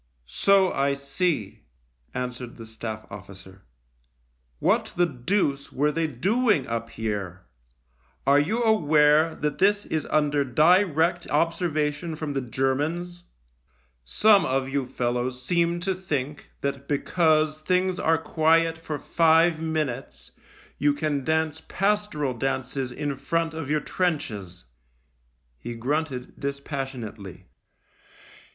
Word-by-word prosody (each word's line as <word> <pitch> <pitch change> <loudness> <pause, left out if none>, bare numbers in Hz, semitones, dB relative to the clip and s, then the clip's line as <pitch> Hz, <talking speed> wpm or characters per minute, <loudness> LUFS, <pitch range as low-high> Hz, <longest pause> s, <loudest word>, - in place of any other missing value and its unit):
"So 190 - +3
I 140 0 +1
see," 140 - -2 0.5
answered 125 -1 -5
the 115 - -9
Staff 110 -1 -6
officer. 95 -1 -11 0.5
" - - -43
What - - +2
the 175 - +5
deuce 140 0 -1
were 150 +3 +1
they 165 +1 0
doing 200 - +1
up 115 0 -3
here? 100 -5 -4 0.8
Are 140 +1 +5
you 215 +11 0
aware 155 -6 +4
that 150 -1 -3
this 205 +2 +3
is 155 -1 -2
under 145 -1 +2
direct 170 - +3
observation 165 -1 0
from 150 -2 -4
the 135 - -1
Germans? 150 +8 -2 0.8
Some 195 - +4
of 135 0 0
you 135 -1 -2
fellows 125 +1 -2
seem 170 +3 +1
to 190 +1 0
think 150 -6 -4
that 140 0 -3
because 155 +1 +2
things 185 +2 +1
are 165 0 +3
quiet 165 +1 +2
for 155 -2 -4
five 165 +2 +3
minutes 135 - -3 0.5
you 145 +1 +3
can 145 -2 -1
dance 160 +1 0
pastoral 200 -9 0
dances 130 +1 -2
in 140 +1 -3
front 165 +4 -1
of 160 -3 -5
your 150 0 +1
trenches." 110 - -3 0.9
He 120 - -6
grunted 130 +1 -3
dispassionately. 135 - -5
145 Hz, 120 wpm, -25 LUFS, 125-165 Hz, 0.9 s, the